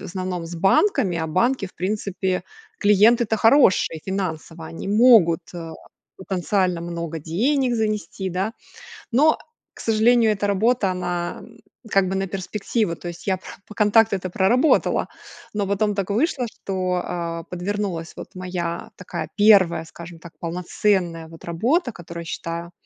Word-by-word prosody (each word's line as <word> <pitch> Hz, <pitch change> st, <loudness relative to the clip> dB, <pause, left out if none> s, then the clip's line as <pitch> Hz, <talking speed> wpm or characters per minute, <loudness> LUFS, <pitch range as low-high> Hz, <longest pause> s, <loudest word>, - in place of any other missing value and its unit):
в -, -, -9 dB
основном, 185 Hz, -2 st, -4 dB
с 170 Hz, -, -7 dB
банками, 190 Hz, -, +2 dB
а 160 Hz, -, -2 dB
банки 200 Hz, +7 st, +1 dB
в 185 Hz, -, -16 dB
принципе- 190 Hz, -1 st, -2 dB, 0.3 s
клиенты-то 220 Hz, +2 st, +4 dB
хорошие 225 Hz, -, +4 dB
финансово. 165 Hz, -4 st, -4 dB
Они 165 Hz, -, -7 dB
могут, 210 Hz, -6 st, +5 dB
а, 165 Hz, -2 st, -6 dB, 0.4 s
потенциально 185 Hz, -1 st, -1 dB
много 170 Hz, -1 st, -5 dB
денег 245 Hz, -, 0 dB
занести, 210 Hz, -4 st, -2 dB
да. 190 Hz, +5 st, -2 dB, 0.6 s
Но, 300 Hz, +6 st, +4 dB, 0.4 s
к -, -, -11 dB
сожалению, 225 Hz, 0 st, +4 dB
эта 205 Hz, 0 st, -1 dB
работа 205 Hz, +1 st, +2 dB
она, 175 Hz, -1 st, -3 dB
м, -, -, -15 dB, 0.3 s
как 195 Hz, -2 st, +3 dB
бы 190 Hz, -, -2 dB
на 195 Hz, 0 st, 0 dB
перспективу. 195 Hz, 0 st, -2 dB
То 175 Hz, -, -7 dB
есть 170 Hz, +3 st, -10 dB
я 190 Hz, -1 st, +2 dB
про 185 Hz, -, -21 dB, 0.2 s
по 210 Hz, -, -12 dB
контакту 210 Hz, 0 st, +4 dB
это 185 Hz, -1 st, -4 dB
проработала, 235 Hz, -, +2 dB, 0.5 s
но 205 Hz, -2 st, -1 dB
потом 205 Hz, +1 st, +1 dB
так 195 Hz, -1 st, -2 dB
вышло, 250 Hz, +4 st, 0 dB
что, 185 Hz, -4 st, -2 dB
а, 170 Hz, -1 st, -4 dB
подвернулась 180 Hz, -1 st, -4 dB
вот -, -, -9 dB
моя 180 Hz, -2 st, -4 dB
такая 185 Hz, -, -6 dB
1, 190 Hz, -6 st, +5 dB
скажем 170 Hz, +1 st, -11 dB
так, 170 Hz, 0 st, -12 dB
полноценная 175 Hz, 0 st, -1 dB
вот 165 Hz, 0 st, -14 dB
работа, 245 Hz, -, 0 dB
которую 170 Hz, -3 st, -9 dB
я -, -, -9 dB
считаю. 170 Hz, +1 st, -5 dB
190 Hz, 150 wpm, -22 LUFS, 170-215 Hz, 0.6 s, могут